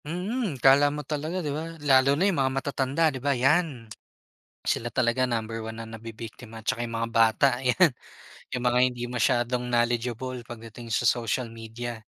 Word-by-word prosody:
Mm 180 - -2
akala 135 +3 +6
mo 150 0 -5
talaga 155 +5 -3
di 145 - -1
ba? 165 +2 -5
Lalo 140 -2 +4
na 185 - +2
yung 180 -8 +2
mga 130 - +2
matatanda 140 +3 +1
di 130 - -6
ba 140 -1 +1
yan, 135 -1 +2 0.8
sila 120 +1 0
talaga 125 +1 +1
number 115 -2 -2
1 110 0 -7
na 115 - -7
nabibiktima 115 0 -9
tsaka 110 +2 -2
yung 120 - -5
mga 115 - -1
bata 115 +3 +4
yan, 150 +9 +5 0.7
yung 125 - -2
mga 125 0 +2
hindi 125 -1 -2
masyadong 125 0 +1
knowledgeable 120 +1 -1
pagdating 115 0 -9
sa 120 +3 +2
social 120 +1 0
media. 115 0 -7
125 Hz, 165 wpm, -26 LUFS, 115-140 Hz, 0.8 s, akala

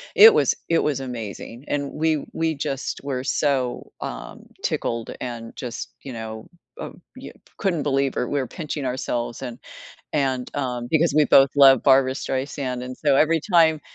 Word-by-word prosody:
it 445 +1 +10
was - - +3
it 165 - +3
was 145 -3 0
amazing, 120 0 -7
and 140 -1 -2
we 155 -1 0
we 160 -1 0
just 135 -1 -4
were 130 -2 -3
so, 135 -3 -1
um, - - -7 0.2
tickled 115 -1 -2
and 115 -2 -6
just, 120 -3 -6
you 135 - -7
know, 110 -1 -7 0.3
uh - - -6 0.3
you - - -10 0.2
couldn't 175 -7 0
believe 135 -1 0
it, 125 - -1
we're 140 -3 -1
pinching 150 -3 -5
ourselves 120 -2 -3
and 120 -2 -6 0.5
and, 135 -4 -1
um, 125 -3 -3
because 160 -1 +2
we 150 - +6
both 135 -1 +6
love 135 -3 +7
Barbara 130 -1 +5
Streisand, 130 -2 -3
and 125 0 -7
so 145 -3 +2
every 160 +3 +3
time, 160 -3 +5
135 Hz, 165 wpm, -23 LUFS, 125-150 Hz, 0.5 s, it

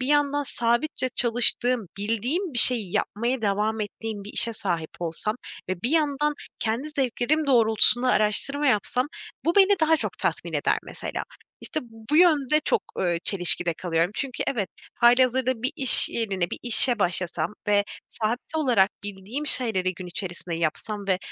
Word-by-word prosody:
bir 255 - -3
yandan 290 0 +1
sabitçe 240 +3 -1
çalıştığım, 245 -1 0
bildiğim 245 - -2
bir 245 - +1
şeyi 220 -6 +6
yapmaya 235 +3 -2
devam 210 +2 -1
ettiğim 210 0 -6
bir 210 - -9
işe 230 - +2
sahip 175 -7 -4
olsam 175 +6 -3 0.3
ve 185 -1 -5
bir 240 - -1
yandan 300 -2 0 0.2
kendi 235 +6 -3
zevklerim 275 +3 -1
doğrultusunda 240 0 +3
araştırma 270 +7 +1
yapsam, 250 +1 0 0.4
bu 335 +3 0
beni 400 0 +4
daha 320 0 +3
çok - - -5
tatmin - - -3
eder - - 0
mesela. - - -7 0.4
İşte 310 - -2
b - - -13 0.3
bu 300 - +2
yönde 305 -4 +3
çok, - - 0 0.2
eee, 175 -2 0
çelişkide 175 -3 +2
kalıyorum. 165 0 -1
Çünkü, 265 +1 -4
evet, 210 -8 -2 0.3
hâlihazırda 250 0 +2
bir 255 - 0
iş 265 -2 +8
yerine, 195 -6 -2
bir - - -6
işe 240 0 +5
başlasam 175 -2 -1 0.2
ve 205 -1 +2 0.2
sabit 235 +6 -4
olarak 240 -10 +2
bildiğim 205 +9 -6
şeyleri 200 -9 +2
gün 185 +1 -9
içerisinde 175 -2 -6
yapsam 185 +6 -4
ve 185 -1 +1
230 Hz, 155 wpm, -24 LUFS, 195-265 Hz, 0.4 s, iş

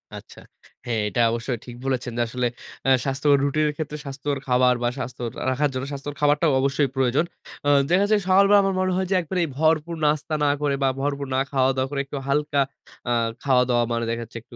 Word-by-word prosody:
আচ্ছা। - - -11 0.5
হ্যাঁ 115 -3 -1
এটা 120 - 0
অবশ্যই 120 +2 -2
ঠিক 120 - -9
বলেছেন 130 -2 -1
যে - - +1
আসলে 125 +1 -1 0.4
অ্যা 135 - +4
স্বাস্থ্যকর 140 +1 +2
রুটিনের 150 +1 +1
ক্ষেত্রে 150 -1 -4
স্বাস্থ্যকর 140 +1 -3
খাবার 125 0 +4
বা 120 - +2
স্বাস্থ্য 130 -1 -6
র - - -3 0.2
রাখার 145 +3 +1
জন্য 130 +1 -3
স্বাস্থ্যকর 140 +1 -6
খাবারটাও 150 +2 +3
অবশ্যই 140 +1 +1
প্রয়োজন। 135 +4 +2 0.4
আ - - +4 0.2
দেখা 190 +3 +4
যায় 210 -1 +4
সকাল 190 +1 +6
বেলা 205 0 +7
আমার 195 -1 0
মনে 185 0 +1
হয় 190 0 -1
যে - - +3
একবারে 180 +2 -3
এই - - -7
ভরপুর 160 +2 +1
নাস্তা 150 +1 0
না - - +3
করে 145 -2 +1
বা 135 - +4
ভরপুর 140 0 -2
না - - +2
খাওয় 135 -1 +3
দাওয়া 130 0 0
করে 140 - -2
একটু 140 +1 -6
হালকা 145 0 +1 0.5
আ - - +3 0.3
খাওয়া-দাওয়া 125 -3 +3
মানে 115 0 -1
দেখা 115 0 -2
যাচ্ছে 115 - -10
একটু 120 - -16
140 Hz, 215 wpm, -23 LUFS, 125-150 Hz, 0.5 s, বেলা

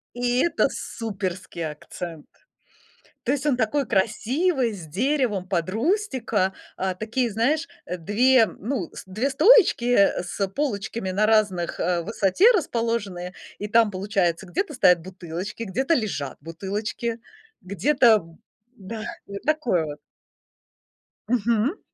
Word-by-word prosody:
И 245 0 +1
это 340 - +2
суперский 185 -6 -4
акцент. 160 +1 -8 1.0
То 255 - 0
есть 285 0 -1
он 270 -4 +2
такой 260 +5 +1
красивый, 240 - +1
с 175 -5 -8
деревом 220 - 0
под 175 -2 -1
рустика, 235 - 0 0.2
а, 190 -1 -1
такие, 230 +4 -1
знаешь, 290 +10 +1 0.2
2, 220 +8 +3
ну, 215 - -4
с - - -8
2 215 +9 -1
стоечки, 380 - +5
э, 200 -7 +3
с 195 +3 -2
полочками 200 -4 -3
на 205 +3 +2
разных, 210 -6 +1
э, 175 0 +1
высоте 220 - +4
расположены, 230 - -2 0.3
и 210 - -3
там 225 -1 +4
получается 190 -2 0
где-то 300 - -2
стоят 180 -9 +4
бутылочки, 185 +4 -6
где-то 265 - 0
лежат 195 - -2
бутылочки, 205 +7 -4 0.4
где-то 215 - +3 0.5
Да, 215 +3 -7 0.2
вот 200 0 -7
такое 255 - +1
вот. 150 0 -7 1.3
Мгм. 235 - +1
215 Hz, 120 wpm, -24 LUFS, 185-250 Hz, 1.3 s, стоечки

